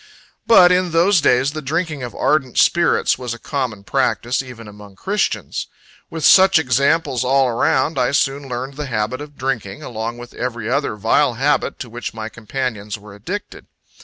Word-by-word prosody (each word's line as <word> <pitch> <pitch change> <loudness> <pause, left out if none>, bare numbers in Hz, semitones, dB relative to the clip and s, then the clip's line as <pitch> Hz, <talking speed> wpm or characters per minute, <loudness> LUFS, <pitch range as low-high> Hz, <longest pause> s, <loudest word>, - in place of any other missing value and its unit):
But, 185 -6 +7
in 180 -2 +1
those 175 +2 +4
days, 130 0 +3
the 155 +1 -6
drinking 155 0 -2
of 120 -1 -6
ardent 145 -5 0
spirits 170 0 +3
was 125 -2 -4
a - - -11
common 125 -6 -4
practice, 120 +5 0
even 125 -4 -11
among 105 -1 -13
christians. 205 - -2 0.4
With 160 -2 -3
such 190 -1 +7
examples 140 0 +1
all 135 +1 +3
around, 130 +5 +1
I 125 - +2
soon 140 0 0
learned 130 +3 -5
the 150 -1 -4
habit 115 +2 -2
of 145 -1 -11
drinking, 120 -7 -3
along 115 0 -5
with 120 0 -11
every 120 -3 -4
other 140 -1 -1
vile 115 +5 +2
habit 140 +3 0
to 120 - -6
which 120 -1 -6
my 110 0 -5
companions 110 -2 -4
were 105 0 -14
addicted. 175 - -7
130 Hz, 170 wpm, -19 LUFS, 115-150 Hz, 0.4 s, But